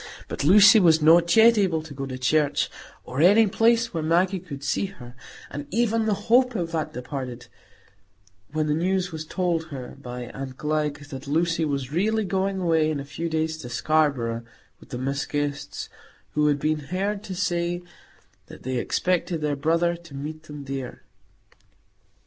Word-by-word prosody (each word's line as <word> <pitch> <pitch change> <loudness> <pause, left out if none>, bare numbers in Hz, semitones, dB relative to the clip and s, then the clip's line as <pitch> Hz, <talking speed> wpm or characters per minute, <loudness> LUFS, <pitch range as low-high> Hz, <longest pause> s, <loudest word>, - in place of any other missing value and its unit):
But - - -4
Lucy 205 +7 +8
was 165 -4 +5
not 170 +2 +5
yet 225 0 +7
able 170 -6 +1
to 160 -2 -10
go 135 0 -5
to 130 -1 -5
church, 145 +3 +1 0.3
or 130 +4 -3
any 205 +6 +6
place 230 +2 +2
where 165 - -1
Maggie 180 +4 +2
could 145 -6 -9
see 140 +8 0
her; 125 -11 -12 0.4
and 145 0 -6
even 225 +1 +1
the 210 - +2
hope 250 +1 +4
of 170 -4 -2
that 155 -2 -2
departed, 125 -2 -6 1.1
when 155 0 0
the 150 - +1
news 180 +3 0
was 160 -1 -6
told 175 -3 -1
her 135 -6 -8
by 125 -2 -6
aunt 130 +1 -7
Glegg, 150 -1 -2
that 135 +1 -7
Lucy 165 +2 +1
was 140 -3 -3
really 215 +6 +1
going 190 +1 -1
away 165 -3 +2
in 155 -2 -2
a 140 - -6
few 155 +4 -4
days 160 0 -1
to 125 -6 -8
Scarborough 120 -3 +1 0.4
with - - -17
the 125 - -5
Miss 135 +3 -2
Guests, 145 -1 -3 0.4
who 150 0 +2
had 145 -1 +3
been 155 +1 0
heard 195 +7 -2
to 190 - -5
say 175 -1 -1 0.6
that - - -13
they 130 0 -2
expected 175 +4 0
their 150 -1 0
brother 165 +4 +1
to 170 -4 -13
meet 155 +3 -6
them 150 -2 -8
there. 135 -2 -6
155 Hz, 175 wpm, -25 LUFS, 140-180 Hz, 1.1 s, Lucy